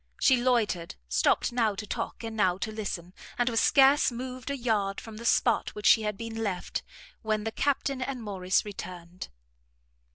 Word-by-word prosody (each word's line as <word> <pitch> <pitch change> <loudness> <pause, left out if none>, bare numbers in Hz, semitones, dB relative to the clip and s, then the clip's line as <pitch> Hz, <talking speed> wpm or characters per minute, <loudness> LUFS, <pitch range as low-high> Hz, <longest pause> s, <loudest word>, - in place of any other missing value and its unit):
She 265 - +5
loitered, 235 -9 0
stopt 65 - +2
now 225 -4 +1
to 210 - -5
talk, 210 - -4
and 225 -1 -5
now 185 -4 +2
to 220 +3 -3
listen, 185 -5 -5 0.2
and 245 - +1
was 225 -1 +1
scarce 275 0 +5
moved 255 +2 -6
a 280 - -2
yard 210 -5 0
from 220 -1 -10
the 235 - -8
spot 235 -1 +2
where 210 - -7
she 225 - +7
had 210 -2 -2
been 230 0 -6
left, 195 -5 -2 0.4
when 215 -1 -1
the 225 - -2
Captain 275 +1 0
and 255 -2 -4
Morrice 190 -3 0
returned. 180 -3 -8
220 Hz, 180 wpm, -28 LUFS, 195-245 Hz, 0.4 s, she